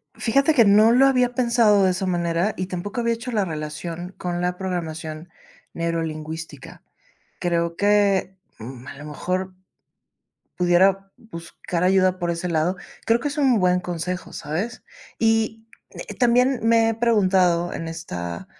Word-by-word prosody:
Fíjate 275 +6 +2
que 240 -5 +6
no 210 +3 +6
lo 265 +3 +5
había 250 -2 +2
pensado 235 -5 +3
de 185 - +3
esa 185 +2 -3
manera 175 +2 0
y 185 - -2
tampoco 190 +6 -4
había 235 0 +1
hecho 230 +2 -7
la 205 -4 0
relación 165 +3 -6
con 175 -1 -3
la 180 0 -2
programación 165 -3 -5 0.4
neurolingüística. 160 -2 -5 0.6
Creo 170 -1 -1
que, 200 -2 +2 0.2
mm, 125 +3 -10
a - - -9
lo 145 - -10
mejor, 185 +5 -3 1.0
pudiera 190 +2 +2
buscar 170 -3 -6
ayuda 185 0 +3
por 175 -1 -1
ese 170 +2 -3
lado. 170 +3 0 0.3
Creo 230 +1 +3
que 290 - -2
es 285 - -7
un 260 -6 +3
buen 180 0 +2
consejo, 180 +1 -4
¿sabes? 175 +11 -4 0.3
Y, 225 0 0 0.3
eh, - - -8
también 250 +1 +3
me 225 0 +4
he 225 - 0
preguntado 185 -7 +2
en 165 - -5
esta 85 - -6
185 Hz, 150 wpm, -23 LUFS, 170-225 Hz, 1.0 s, que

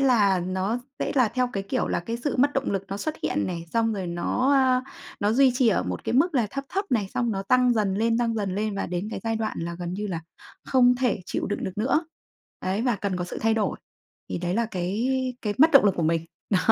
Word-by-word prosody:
là 210 -8 +4
nó 190 +6 -1 0.2
sẽ - - -1
là 250 -5 +4
theo, 250 +1 0
cái 195 - -2
kiểu 195 - -1
là, - - 0
cái 230 +7 -4
sự 255 +4 -2
mất 285 +3 +3
động 270 - 0
lực 195 -1 -1
nó 195 - -3
xuất 310 +8 -3
hiện - - 0
này, 170 -2 -4
xong 225 -1 +2
rồi 195 -3 -3
nó, 175 +10 0
a, 260 -2 +4 0.4
nó 205 0 +2
duy 260 +1 +5
trì 250 -2 +3
ở 210 - +2
một 90 -1 -5
cái - - -1
mức 320 +7 +3
là 240 -5 +2
thấp 275 0 -4
thấp 395 +2 -1
này, 210 -6 +1
xong 240 -2 +1
nó 195 -1 -2
tăng 250 +4 +4
dần 205 -3 +1
lên, 230 +2 +1
tăng 235 -1 +1
dần 200 -4 -2
lên 210 +1 -1
và 195 - -2
đến 180 +4 -3
cái - - -5
giai 225 0 0
đoạn 220 -1 -3
là 170 +1 -4
gần 175 0 -4
như 210 +1 -3
là 170 -4 -3 0.4
không 250 -1 +4
thể 245 -6 +1
chịu - - -2
đựng 205 - -3
được 190 +2 -5
nữa, 285 +8 +1 0.5
ấy, 190 +4 -1
và 245 -3 +1
cần 195 -1 -2
có 180 - -2
sự - - -6
thay 225 0 +2
đổi. 220 -2 0 0.5
Thì - - -2
đấy 175 +1 -2
là 230 +2 +1
cái 200 +4 -2 0.3
cái 210 -2 -1
mất 315 +3 +7
động 275 - +8
lực 200 -3 +4
của 170 - 0
mình. 165 +1 +1 0.3
Đó, 195 - +4
215 Hz, 260 wpm, -25 LUFS, 190-250 Hz, 0.5 s, động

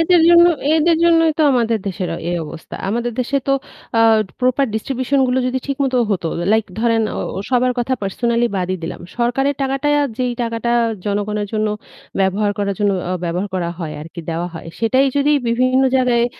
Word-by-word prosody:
এদের 340 +1 +4
জন্য, 345 0 +8 0.3
এদের 330 +1 +3
জন্যই 330 -1 +4
তো 315 - +4
আমাদের 230 -3 +1
দেশের 185 -2 -3
অ - - -5
এই 175 - -1
অবস্থা। 160 +1 -10
আমাদের 235 +3 -1
দেশে 270 +3 -1
তো - - +4 0.5
আ - - +5 0.4
proper 255 +2 +2
distribution 260 +4 -1
গুলো 250 - +1
যদি 255 +1 -1
ঠিকমতো 275 -2 0
হতো, 185 -4 -1 0.3
like 220 -1 +1
ধরেন 230 -1 +2
ও - - -3 0.2
ও - - -2
সবার 250 0 +2
কথা 250 +2 0
personally 235 +4 0
বাদই 185 0 -1
দিলাম। 165 - -5 0.2
সরকারের 270 +4 +1
টাকাটা, 270 +2 -1 0.3
যেই 250 -1 0
টাকাটা 230 0 -2 0.4
জনগণের 205 +1 -1
জন্য 215 0 0 0.5
ব্যবহার 195 +2 +1
করার 200 -1 -1
জন্য 205 -1 +3 0.2
অ - - 0
ব্যবহার 180 +4 -2
করা 175 -2 -1
হয় 160 -4 -5
আরকি, 165 +2 -9
দেওয়া 170 +2 -2
হয়, 165 0 -8
সেটাই 260 +4 +3
যদি 285 +1 +3 0.2
বিভিন্ন 255 +3 +2
জায়গায় 245 -2 +2
235 Hz, 180 wpm, -19 LUFS, 200-265 Hz, 0.5 s, জন্য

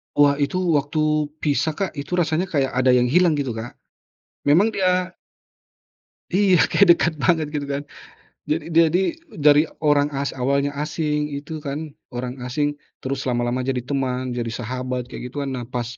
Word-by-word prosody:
Wah, 145 0 +4
itu 145 +4 0 0.2
waktu 150 +1 +1 0.2
pisah 150 +1 +1
Kak 195 +1 -2
itu 145 +4 -4
rasanya 170 +1 +1
kayak 140 -6 0
ada 130 0 +3
yang 125 - +4
hilang 165 +6 +3
gitu, 140 -4 -2
Kak. 115 +2 -7 0.7
Memang 175 +10 +5
dia 185 -2 0 1.2
Iya, 190 -1 +4
kayak 200 - +4
dekat 170 - +1
banget 160 -1 +3
gitu 145 -1 -2
kan. 140 0 -2 0.7
Jad 155 +1 0
jadi 165 +3 +3 0.2
dari 150 +1 +5 0.2
orang 145 -1 +4
as 140 +1 -2
awalnya 140 +2 0
asing, 150 -1 -1
itu 150 +2 -6
kan 150 +1 -5 0.2
orang 125 +1 -5
asing 145 +4 -1 0.3
terus 135 0 -2
lama-lama 120 0 0
jadi 130 -1 -2
teman, 130 -2 -2
jadi 120 -1 -3
sahabat 125 +2 -4
kayak 125 - -6
gitu 140 +3 -4
kan. 135 - -3
Nah 125 -2 -4
pas 125 -1 -3
145 Hz, 160 wpm, -22 LUFS, 130-155 Hz, 1.2 s, Memang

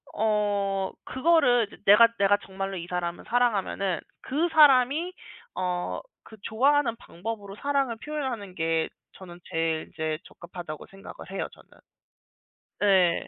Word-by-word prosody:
어 205 -3 0
그거를 260 -5 +3
이제 - - -15
내가 210 +3 +9
내가 200 +1 +4
정말로 195 0 -4
이 170 - -5
사람을 175 -1 -3
사랑하면은 205 -6 +1 0.2
그 305 +6 0
사람이 300 +3 +5 0.4
어 180 -1 -2 0.2
그 220 - -14
좋아하는 260 +1 +2
방법으로 200 +2 -7
사랑을 275 -5 0
표현하는 260 -11 -4
게 165 -1 0 0.3
저는 175 -2 -12
제일 165 -1 -1
이제 155 -2 -3
적합하다고 170 -3 -9
생각을 195 0 -11 0.2
해요 195 - -3
저는. - - -19 1.1
네. 190 -4 +3
200 Hz, 285 characters per minute, -27 LUFS, 180-245 Hz, 1.1 s, 내가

